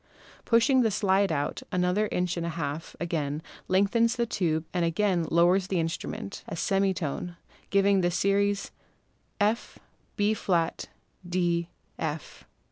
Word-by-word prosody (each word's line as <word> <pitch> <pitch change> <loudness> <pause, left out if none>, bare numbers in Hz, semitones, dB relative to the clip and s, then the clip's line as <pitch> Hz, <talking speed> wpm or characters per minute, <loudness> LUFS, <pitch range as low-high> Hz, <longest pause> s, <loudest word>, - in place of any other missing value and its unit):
Pushing 245 +3 +4
the 225 - +3
slide 200 -1 +2
out 145 - -1
another 185 +4 +1
inch 180 -1 0
and 170 - -3
a 170 - -2
half 150 +1 -4
again 155 -4 -2 0.3
lengthens 215 +5 +3
the 240 -1 +1
tube 165 -7 -1
and 175 -2 +1
again 175 0 +1
lowers 180 +3 +4
the 190 -3 0
instrument 165 - -4
a - - -5
semi 195 +2 +2
tone, 175 0 -4 0.3
giving 200 -1 +4
the 175 - +2
series 200 +2 +1 0.7
F, 215 +3 0 0.4
Bb, 195 -5 0 0.4
D, 175 -1 0 0.3
F. 155 -2 -5
180 Hz, 130 wpm, -28 LUFS, 170-200 Hz, 0.7 s, Pushing